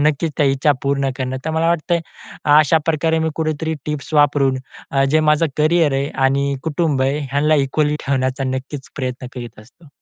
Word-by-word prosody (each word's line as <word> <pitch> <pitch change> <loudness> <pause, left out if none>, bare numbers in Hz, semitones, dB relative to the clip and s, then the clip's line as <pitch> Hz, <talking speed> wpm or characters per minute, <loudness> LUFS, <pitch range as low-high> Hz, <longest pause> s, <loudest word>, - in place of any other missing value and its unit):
नक्कीच, 150 +1 +1
त्या 145 - +3
इच्छा 135 +2 +3
पूर्ण 140 -1 0
करणं. 130 -1 -3
तर 160 - -1
मला 160 +1 0
वाटतंय 170 +1 +1 0.6
अशाप्रकारे 160 +1 +2
मी 160 0 0
कुठेतरी 160 0 -2
टिप्स 150 0 -4
वापरून 145 -3 +3 0.3
अ, 135 0 +2
जे 155 - +4
माझं 150 +2 +3
करिअर 155 -1 +3
आहे 135 +1 0 0.2
आणि 140 +1 +1
कुटुंब 155 -3 0
आहे 135 +3 +1
ह्यांना 150 +2 +2
इक्वली 150 +2 0
ठेवण्याचा 130 0 0
नक्कीच 130 +1 -5
प्रयत्न 130 -2 -4
करीत 120 -3 -8
असतो. 145 +8 -19
145 Hz, 170 wpm, -19 LUFS, 135-155 Hz, 0.6 s, जे